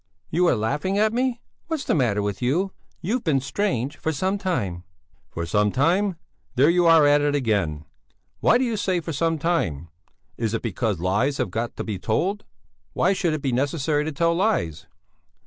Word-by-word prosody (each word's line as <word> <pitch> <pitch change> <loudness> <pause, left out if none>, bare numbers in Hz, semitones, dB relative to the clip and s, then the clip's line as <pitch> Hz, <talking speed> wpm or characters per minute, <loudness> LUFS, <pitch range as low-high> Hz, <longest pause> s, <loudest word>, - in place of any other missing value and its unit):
"You 175 +3 +3
are - - +4
laughing 150 - -1
at 215 +1 +2
me! 250 0 0 0.3
What's 320 -3 -2
the - - 0
matter 115 -8 +1
with 100 +1 -3
you? 170 +11 +1 0.3
You've 225 +8 -1
been 150 -6 +2
strange 135 - -2
for 160 - -1
some 190 +6 -1
time." 105 - -2 0.5
"For 85 - -4
some 105 +4 +2
time? 180 - +2 0.4
There 140 +6 +5
you 175 0 +3
are 165 -2 +7
at 145 0 +5
it 145 0 +1
again! 100 - 0 0.5
Why 240 - +4
do 255 - +1
you 230 -3 -1
say 185 -3 0
for 165 -1 -5
some 165 +3 0
time? 85 - -1 0.5
Is 115 -1 -1
it - - -3
because 110 -3 -1
lies 105 +11 +1
have 90 - -2
got 115 +3 -3
to - - -4
be 105 -4 -4
told? 190 - -1 0.5
Why 185 +3 +2
should 170 -4 0
it 150 - -6
be 135 - 0
necessary 145 +3 0
to 155 - -2
tell 170 +3 +1
lies?" 85 - 0
145 Hz, 190 wpm, -24 LUFS, 110-180 Hz, 0.5 s, are